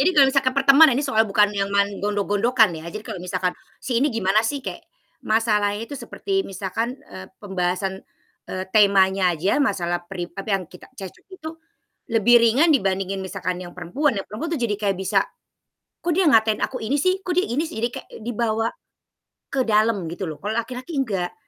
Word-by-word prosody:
jadi 290 - +4
kalau 280 -2 +8
misalkan 265 -2 +2
perteman 275 +3 +7
ini 285 - 0
soal 220 -5 +2
bukan 205 +1 +3
yang 195 -1 -1
main 200 0 0
gondok-gondokan, 205 +2 +2
ya, 165 - -8
jadi 215 +5 -7
kalau 180 - -6
misalkan, 180 0 -2 0.2
si 240 -2 -1
ini 290 - +3
gimana 215 -4 +2
sih 265 +4 -3
kayak, - - -5 0.4
masalahnya 215 -1 +1
itu 230 - -12
seperti 390 -1 -2
misalkan, 200 +6 -3 0.2
eee, 95 0 -9
pembahasan, 190 -1 -2 0.5
eee, 185 0 -4
temanya 190 -3 +4
aja 190 - +1
masalah 175 -10 0
peri 175 -3 -6
tapi, 195 +2 -7
yang 195 -3 0
kita 180 +2 -15
cek-cok 190 -5 -10
itu, 315 -3 -7 0.6
lebih 230 0 +5
ringan 255 +9 +4
dibandingin 195 -5 0
misalkan 180 -1 -4
yang 175 -1 -9
perempuan, 230 - -1
yang 195 - -3
perempuan 235 +11 -5
tuh 260 - -6
jadi 215 -3 0
kayak 200 -2 0
bisa, 190 0 +1 0.8
"Kok, 345 - -1
dia 370 +1 +2
ngatain 220 -6 +4
aku 255 - -2
ini, 225 +5 -1
sih! 370 +5 +1
Kok, 365 -1 -2
dia 365 +2 +2
ini, 255 +6 -1
sih!" 320 - -8
Jadi, 235 - +2
kayak - - -8
dibawa, 225 -1 -1 0.8
ke 265 -2 0
dalam 215 -3 +2
gitu 175 +2 -5
loh. 155 - -7
Kalau 210 +2 -4
laki-laki 250 +6 -4
enggak. 205 - -1
215 Hz, 185 wpm, -23 LUFS, 190-255 Hz, 0.8 s, kalau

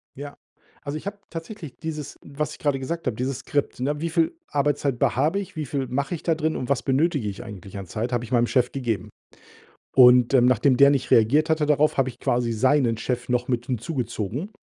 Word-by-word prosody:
Ja, 140 +1 -8 0.4
also, 145 +1 -4
ich 155 - -10
habe 200 0 -5
tatsächlich 165 - -8
dieses 155 -3 -6
was 150 +2 -4
ich - - -13
gerade 145 -2 0
gesagt 165 +6 -4
habe, 125 - -1
dieses 130 +1 -2
Skript: 145 -3 -2
„Ne, 145 +2 -1
wie 165 - -1
viel 165 - +1
Arbeitszeit 145 -2 0
be - - +1
habe 165 +7 +1
ich, 195 -5 -8
wie 155 - -2
viel 135 -1 -3
mache 140 +6 -2
ich 160 - -10
da 165 - +1
drin 155 0 -1
und 125 - -4
was 140 - +1
benötige 140 -2 +1
ich 100 +2 -6
eigentlich 100 -3 -9
an 100 - -6
Zeit“, 115 +7 -4
habe 120 -1 0
ich 120 - -10
meinem 120 -1 +3
Chef 125 -1 +1
gegeben. 120 -6 -3 0.9
Und, 125 0 +7
ähm, 125 -2 +6
nachdem 125 +2 +3
der 140 +2 +7
nicht 140 -2 -1
reagiert 145 +8 +4
hatte 155 -1 +2
darauf, 150 +1 +2
habe 135 -1 +2
ich 125 -1 -9
quasi 120 -1 0
seinen 125 +1 +2
Chef 125 0 -3
noch 125 0 0
mit 120 -1 -1
hinzugezogen, 125 - -3
135 Hz, 220 wpm, -24 LUFS, 120-150 Hz, 0.9 s, Und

